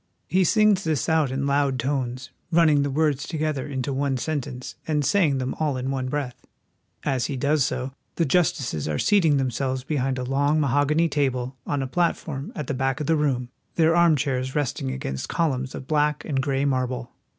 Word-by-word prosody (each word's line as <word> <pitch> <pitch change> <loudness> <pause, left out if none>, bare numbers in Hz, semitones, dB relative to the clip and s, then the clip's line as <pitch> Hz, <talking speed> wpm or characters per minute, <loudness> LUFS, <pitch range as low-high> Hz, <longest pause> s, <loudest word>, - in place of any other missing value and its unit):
He 185 +1 +3
sings 210 0 +4
this 155 -5 0
out 160 -4 +2
in 135 +2 -2
loud 140 -1 +1
tones, 130 0 -2 0.2
running 160 -3 +5
the 140 - 0
words 145 -1 0
to 165 - -4
gether 155 -3 -1
into 135 -1 -3
one 135 0 0
sentence, 130 -3 -4
and 150 -2 +1
saying 165 -8 +3
them 130 0 -2
all 150 -4 0
in 130 +1 -2
one 130 -1 -2
breath. 130 -3 -3 0.6
As 130 -4 0
he 140 - -3
does 145 +2 +2
so 130 +2 -2 0.2
the 165 - +1
justices 135 - +1
are 75 -1 -1
seating 165 - +3
themselves 130 0 -1
be 150 +2 -2
hind 130 0 0
a 125 - -2
long 140 +4 +1
mahogany 145 +4 +2
table 130 -4 -1
on 145 -2 0
a - - -3
platform 155 -3 -1
at 150 - -4
the 140 - -2
back 135 0 -1
of 150 - -2
the 160 - +3
room, 135 -5 0 0.3
their 165 0 +4
armchairs 140 -6 +2
resting 140 - -1
against 65 0 -4
columns 135 -6 -1
of - - -7
black 150 0 +1
and 135 -3 0
gray 135 0 0
marble. 130 -2 -1
140 Hz, 195 wpm, -24 LUFS, 130-155 Hz, 0.6 s, running